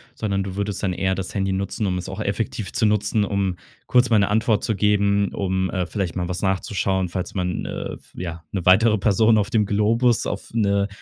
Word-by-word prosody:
sondern 100 -3 -1
du 95 -1 -6
würdest 100 0 -3
dann 95 -3 0
eher 95 +1 0
das 95 -1 -5
Handy 95 -1 0
nutzen, 100 +2 -2
um 90 -1 0
es 90 - -5
auch 105 +3 -5
effektiv 110 +1 -3
zu 110 - +1
nutzen, 105 0 +2
um 95 -3 -1 0.3
kurz 125 0 +4
mal 110 -2 +4
'ne 100 - +2
Antwort 110 0 +2
zu 110 - 0
geben, 100 -1 +2
um, 95 -1 -1
äh, 90 -2 -1
vielleicht 95 -2 -3
mal 90 -1 -2
was 90 - -3
nachzuschauen, 95 -1 0
falls 90 0 -4
man, 90 -2 -2
äh, - - -5
f - - -19
ja 85 -2 -6
‘ne 95 -4 -3
weitere 110 +4 +5
Person 110 +3 +3
auf 100 -1 +1
dem 105 -2 +2
Globus 115 +4 +2
auf 100 - -4
'ne 100 -3 +2
100 Hz, 220 wpm, -22 LUFS, 95-105 Hz, 0.3 s, weitere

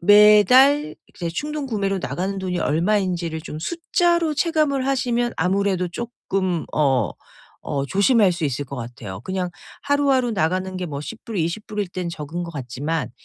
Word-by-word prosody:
매달 210 - +6 0.2
이제 170 -2 -4
충동구매로 225 - -2
나가는 195 +2 -2
돈이 185 -2 -2
얼마인지를 170 -1 0
좀 155 - -7
숫자로 340 - +1
체감을 300 -4 +1
하시면 245 -3 0
아무래도 185 +1 +1
쪼끔 190 -5 -3
어 135 -6 +2 0.5
어 140 -1 -1
조심할 200 - +4
수 170 -2 -3
있을 140 +1 -2
것 140 - -7
같아요. 115 -5 -7
그냥 185 0 -2 0.3
하루하루 280 -3 +2
나가는 185 +1 -1
게 180 - -3
뭐 145 -3 -5
10 230 +8 -8
불, 225 - -5
20 170 +6 -2
불일 210 -3 -3
땐 180 -1 -4
적은 165 +1 -5
것 170 - -7
같지만 145 +4 -3
190 Hz, 310 characters per minute, -22 LUFS, 165-240 Hz, 0.5 s, 매달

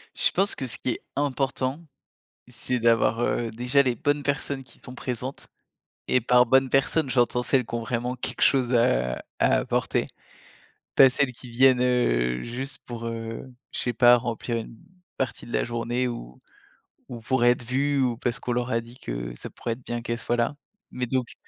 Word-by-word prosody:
Je - - +3
pense 195 +2 +2
que 130 - -4
ce 115 - -2
qui 125 - -2
est - - -3 0.2
important, 135 0 -1 0.7
c'est 125 +1 -1
d'avoir, 115 0 +3
heu, 120 -1 0
déjà, 125 +5 +2
les 125 -3 0
bonnes 145 +4 0
personnes 140 -1 -2
qui 125 - -16
sont 125 - -11
présentes 125 +1 -5 0.6
et 125 - +3
par 125 +1 +5
bonnes 130 +2 +4
personnes, 135 +1 +2
j'entends 125 -1 +2
celles 125 -1 +1
qui - - -7
ont 120 - -1
vraiment 120 +2 -2
quelque 125 - -5
chose, 130 -2 +4
heu, 120 - +5 0.6
à - - +4
apporter. - - 0 0.9
Pas 135 - +8
celles 130 0 0
qui 125 +1 -11
viennent, 125 +1 +4
heu, 60 - +2
juste, 130 +4 -5
pour, 115 -1 -6
heu, 115 0 -5 0.3
je - - -4
sais 120 - -1
pas, 120 +1 +7
remplir 120 0 -2
une 115 0 -7 0.4
partie 130 -3 -3
de 120 - -11
la - - +2
journée 120 +1 -1
ou 65 - -7 0.7
ou 120 - -6
pour 120 +2 0
être 120 0 +4
vues 140 +3 +1
ou 125 -2 +1
parce 120 0 -2
qu'on 125 - -2
leur 125 +1 -1
a 115 - +2
dit 115 +2 -12
que - - -5
ça - - -7
pourrait 115 - -4
être 120 +2 -13
bien 120 0 -3
qu'elles 115 0 -3
soient 120 +1 -1
là. 120 +5 0 0.4
Mais, 125 0 -2
donc 130 -1 -1
125 Hz, 195 wpm, -25 LUFS, 115-130 Hz, 0.9 s, Pas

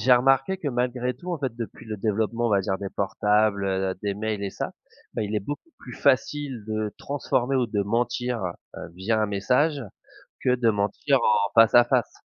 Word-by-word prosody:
j'ai 125 +4 +4
remarqué 135 +8 +4
que 150 - -2
malgré 125 0 -1
tout, 180 +7 -6
en 165 - -2
fait, 130 -4 -3
depuis 115 -1 -7
le 110 -1 -4
développement 110 +3 0
on - - 0
va 100 -1 +4
dire 95 0 -2
des 100 -1 -5
portables 105 +1 +1
heu, 95 -1 0
des 100 -1 -1
mails 105 -1 -3
et 100 - -3
ça, - - -4 0.4
bah - - -1
il 105 0 -3
est - - 0
beaucoup 145 - -6
plus 125 - -11
facile 135 -3 0
de 110 -1 -2
transformer 135 -2 -1
ou 125 -2 +2
de 105 -2 -1
mentir 120 +2 -1 0.4
heu, - - -7
via 110 +4 0
un 105 - +2
message, 130 +9 +1 0.6
que 125 -1 +3
de 120 -2 +2
mentir 105 +7 +1
en 105 -3 +2
face 115 - +6
à 120 - +9
face. - - +1
115 Hz, 205 wpm, -25 LUFS, 105-125 Hz, 0.6 s, à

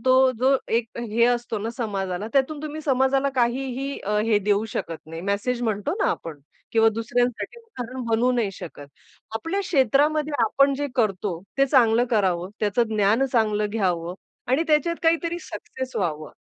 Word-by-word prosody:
तो 260 0 +5
जो 265 +3 +4
एक 230 0 +1
अ, - - -2
हे 235 0 +1
असतो 240 -2 0
ना 220 +3 -3
समाजाला, 195 -4 -3
त्यातून 285 +2 +1
तुम्ही 310 +1 -5
समाजाला 270 0 +2
काहीही 260 +2 -1
अ, 210 +1 -1
हे 220 -2 +3
देऊ 205 +1 +1
शकत 165 -1 -3
नाही, 165 +1 -7
मेसेज 205 +6 -1
म्हणतो 210 -4 -1
ना - - +3
आपण 155 -3 -5 0.3
किंवा 225 0 +5
दुसऱ्यांसाठी 240 - -1
उदाहरण 260 - -7
बनू 230 +2 +2
नाही 235 -5 0
शकत. 150 -5 -9 0.5
आपल्या 330 - -2
क्षेत्रामध्ये 300 - +2
आपण 275 +5 +3
जे 290 +1 -2
करतो, 195 -6 0 0.2
ते 275 - +5
चांगलं 245 -3 +4
करावं 185 -5 +1
त्याचं 210 +3 +2
ज्ञान 210 +5 +3
चांगलं 215 -3 +2
घ्यावं 180 -5 -1 0.4
आणि 270 +5 +3
त्याच्यात 310 +2 +2
काहीतरी 335 +1 +1
सक्सेस 260 0 -7
व्हावं. 155 -5 -2
235 Hz, 160 wpm, -24 LUFS, 205-270 Hz, 0.5 s, तो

